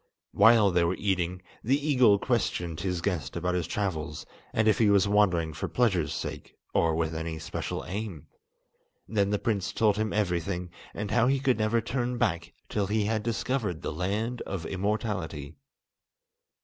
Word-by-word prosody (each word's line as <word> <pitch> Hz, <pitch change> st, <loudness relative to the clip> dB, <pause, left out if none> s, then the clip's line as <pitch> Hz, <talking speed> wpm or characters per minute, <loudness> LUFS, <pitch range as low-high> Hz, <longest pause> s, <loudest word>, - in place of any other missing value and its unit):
While 115 Hz, -4 st, +6 dB
they 90 Hz, -1 st, +3 dB
were 85 Hz, +2 st, +1 dB
eating, 90 Hz, -2 st, -1 dB, 0.2 s
the 130 Hz, +5 st, +3 dB
eagle 130 Hz, -8 st, +4 dB
questioned 90 Hz, -8 st, -1 dB
his 90 Hz, -3 st, -2 dB
guest 85 Hz, -5 st, -2 dB
about 90 Hz, +1 st, -1 dB
his 90 Hz, -3 st, -1 dB
travels, 80 Hz, -7 st, -3 dB, 0.3 s
and 110 Hz, 0 st, +1 dB
if 110 Hz, -, +4 dB
he 110 Hz, -3 st, +5 dB
was 100 Hz, -1 st, +4 dB
wandering 90 Hz, -6 st, +2 dB
for 75 Hz, -, -4 dB
pleasure's 95 Hz, -, +1 dB
sake, -, -, -6 dB, 0.2 s
or 80 Hz, -1 st, +2 dB
with 80 Hz, 0 st, -1 dB
any 80 Hz, 0 st, -4 dB
special 80 Hz, +1 st, -4 dB
aim. 100 Hz, -5 st, -5 dB, 0.8 s
Then 100 Hz, -2 st, +1 dB
the 105 Hz, -, +1 dB
prince 100 Hz, -4 st, -1 dB
told 105 Hz, -2 st, +2 dB
him 110 Hz, -1 st, 0 dB
everything, 90 Hz, -3 st, -1 dB, 0.2 s
and 105 Hz, -1 st, -4 dB
how 120 Hz, +1 st, +4 dB
he 135 Hz, +1 st, +2 dB
could 130 Hz, -3 st, +1 dB
never 110 Hz, +2 st, +2 dB
turn 125 Hz, +1 st, -2 dB
back 85 Hz, -8 st, 0 dB, 0.2 s
till 100 Hz, -2 st, -1 dB
he 105 Hz, 0 st, +1 dB
had 110 Hz, 0 st, 0 dB
discovered 115 Hz, -5 st, -2 dB
the -, -, -3 dB
Land 105 Hz, +8 st, -2 dB
of 95 Hz, -4 st, -5 dB
Immortality. 95 Hz, -7 st, -2 dB
100 Hz, 165 wpm, -28 LUFS, 85-110 Hz, 0.8 s, While